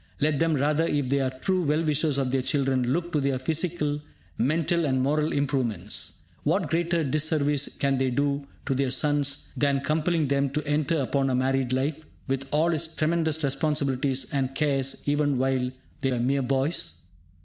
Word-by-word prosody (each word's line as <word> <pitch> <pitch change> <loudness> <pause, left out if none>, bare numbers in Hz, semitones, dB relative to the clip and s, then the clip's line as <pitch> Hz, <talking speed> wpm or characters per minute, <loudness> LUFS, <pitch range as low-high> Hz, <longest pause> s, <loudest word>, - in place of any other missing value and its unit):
Let 150 -1 +1
them, 165 -1 +2
rather, 150 +4 +1
if 145 -5 0
they 140 +1 +2
are 130 -1 +1
true 180 +9 -1
well 155 0 +1
wishers 150 -2 +1
of 135 -2 0
their 135 0 +1
children, 130 -2 +1
look 175 +3 -1
to 150 - +1
their 135 -1 +1
physical, 150 +1 -1 0.3
mental 165 +3 +1
and 130 -2 +1
moral 150 +4 +1
improvements. 135 -6 -1 0.2
What - - 0
greater 170 0 +1
disservice 145 0 +1
can 135 -1 +1
they 130 -1 +1
do 140 +2 -1 0.2
to - - 0
their 135 0 0
sons 145 +1 +1
than 140 -1 +1
compelling 155 +1 +1
them 140 0 +1
to 150 0 -2
enter 150 +3 +1
upon 135 0 0
a 130 - +1
married 130 0 +1
life, 140 +4 -1 0.2
with 135 0 -2
all 160 +3 +2
its 160 +1 -1
tremendous 160 -1 0
responsibilities 135 -2 0
and 135 -1 -1
cares, 135 -2 0
even 145 -1 +1
while 130 -1 +1 0.3
they 135 - +1
are 125 - 0
mere 135 +3 +1
boys? 130 - 0
140 Hz, 175 wpm, -26 LUFS, 135-155 Hz, 0.3 s, them